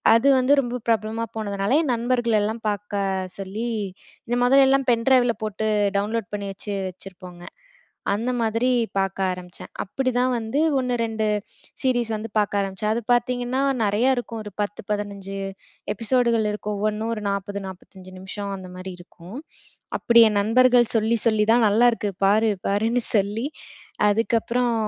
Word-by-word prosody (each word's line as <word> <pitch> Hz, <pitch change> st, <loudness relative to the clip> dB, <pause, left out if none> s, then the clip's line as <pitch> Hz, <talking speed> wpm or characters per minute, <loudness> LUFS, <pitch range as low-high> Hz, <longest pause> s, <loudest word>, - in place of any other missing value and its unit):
அது 230 Hz, +4 st, +3 dB
வந்து 255 Hz, +2 st, +3 dB
ரொம்ப 245 Hz, -1 st, -4 dB
பிரபலமா 225 Hz, +1 st, 0 dB
போனதுனால, 200 Hz, +4 st, 0 dB
என் 265 Hz, -5 st, 0 dB
நண்பர்களெல்லாம் 230 Hz, -2 st, 0 dB
பார்க்க 195 Hz, -3 st, -3 dB
சொல்லி 205 Hz, +5 st, -4 dB, 0.6 s
இந்த 240 Hz, -, 0 dB
மொதலெல்லாம் 270 Hz, +1 st, +4 dB
பென் 230 Hz, -1 st, +1 dB
டிரைவ்ல 245 Hz, -3 st, +4 dB
போட்டு 215 Hz, 0 st, -2 dB, 0.3 s
டவுன்லோட் 210 Hz, 0 st, -2 dB
பண்ணி 205 Hz, -1 st, -3 dB
வச்சு 205 Hz, +2 st, -6 dB, 0.2 s
வச்சிருப்போங்க. 180 Hz, -1 st, -11 dB, 0.7 s
அந்த 230 Hz, +5 st, -1 dB
மாதிரி 230 Hz, +2 st, +1 dB, 0.3 s
பார்க்க 195 Hz, 0 st, -1 dB
ஆரம்பிச்சேன். 180 Hz, -1 st, -9 dB
அப்பிடிதான் 255 Hz, +3 st, 0 dB
வந்து 230 Hz, +4 st, -2 dB, 0.2 s
1, 250 Hz, -1 st, -1 dB
2 220 Hz, -1 st, -2 dB, 0.6 s
சீரீஸ் 245 Hz, -4 st, +1 dB
வந்து 215 Hz, +1 st, -5 dB
பார்க்க 205 Hz, -1 st, +1 dB
ஆரம்பிச்சேன். 195 Hz, +2 st, -2 dB
அது 235 Hz, -, -2 dB
பார்த்தீங்கன்னா, 245 Hz, +1 st, 0 dB, 0.2 s
நெறையா 215 Hz, +6 st, +2 dB
இருக்கும். 230 Hz, -2 st, -4 dB
ஒரு 210 Hz, -, -8 dB
10, 205 Hz, 0 st, -3 dB
15 200 Hz, -1 st, -4 dB, 0.6 s
எபிசோடுகள் 230 Hz, 0 st, +1 dB
இருக்கும். 210 Hz, 0 st, -4 dB
ஒவ்வொன்னும் 215 Hz, +2 st, -1 dB
ஒரு 215 Hz, -, -6 dB
40, 200 Hz, 0 st, -3 dB
45 185 Hz, 0 st, -12 dB
நிமிஷம் 200 Hz, +1 st, -5 dB
அந்தமாரி 185 Hz, 0 st, -8 dB
இருக்கும். 175 Hz, +4 st, -12 dB, 0.6 s
அப்பிடி 235 Hz, 0 st, +6 dB
என் 205 Hz, -1 st, +1 dB
நண்பர்கள் 245 Hz, +2 st, +4 dB
சொல்லி 225 Hz, +1 st, +2 dB
சொல்லி 215 Hz, -2 st, +3 dB
தான் 235 Hz, -1 st, +4 dB
"நல்லாயிருக்கு 225 Hz, 0 st, +3 dB
பாரு-பாரு"ன்னு 215 Hz, +3 st, +1 dB
சொல்லி 210 Hz, +4 st, 0 dB, 0.6 s
அதுக்கப்புறம் 235 Hz, +3 st, +1 dB
220 Hz, 135 wpm, -23 LUFS, 200-240 Hz, 0.7 s, அப்பிடி